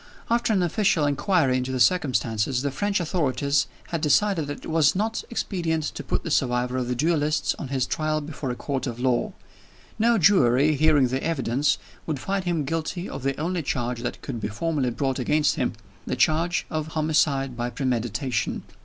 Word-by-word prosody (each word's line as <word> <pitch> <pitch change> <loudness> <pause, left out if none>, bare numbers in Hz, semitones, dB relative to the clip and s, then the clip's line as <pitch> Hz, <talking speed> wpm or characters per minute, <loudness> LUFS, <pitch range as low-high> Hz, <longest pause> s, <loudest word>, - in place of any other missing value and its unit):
After 235 0 +2
an 190 -4 +2
official 175 -3 +2
inquiry 145 -2 +2
into 130 +1 -2
the 130 - -2
circumstances, 125 -4 +2
the 140 - 0
French 205 +6 0
authorities 140 -4 0 0.2
had 165 -3 -2
decided 160 +2 +2
that 145 - -6
it - - -5
was 160 -1 +4
not 220 +3 -1
expedient 170 -8 -1
to - - -6
put - - -2
the 165 - -4
survivor 125 -2 +1
of 125 -1 -1
the 125 - -1
duelists 150 0 +1
on - - -4
his 130 -1 0
trial 155 +4 -1
before 145 -2 -5
a 125 - -2
court 135 +1 -3
of 120 -1 -5
law. 125 -1 +1 0.7
No 230 +1 +4
jury, 155 - +4
hearing 145 -3 +4
the 130 +2 -2
evidence, 140 -3 +1 0.3
would 155 -3 -1
find 195 +5 -2
him 170 -5 0
guilty 165 +4 -3
of 135 - -6
the 135 +1 -2
only 175 +2 -1
charge 120 -4 -2
that 120 - -5
could 120 -5 -5
be - - -1
formally 140 +4 -1
brought 135 +2 -1
against 150 +4 +2
him 125 -5 0 0.3
the - - -1
charge 165 +3 +2
of 155 -1 -2
"homicide 150 -4 +1
by 120 0 -2
premeditation." 120 -2 -2
145 Hz, 185 wpm, -25 LUFS, 130-165 Hz, 0.7 s, was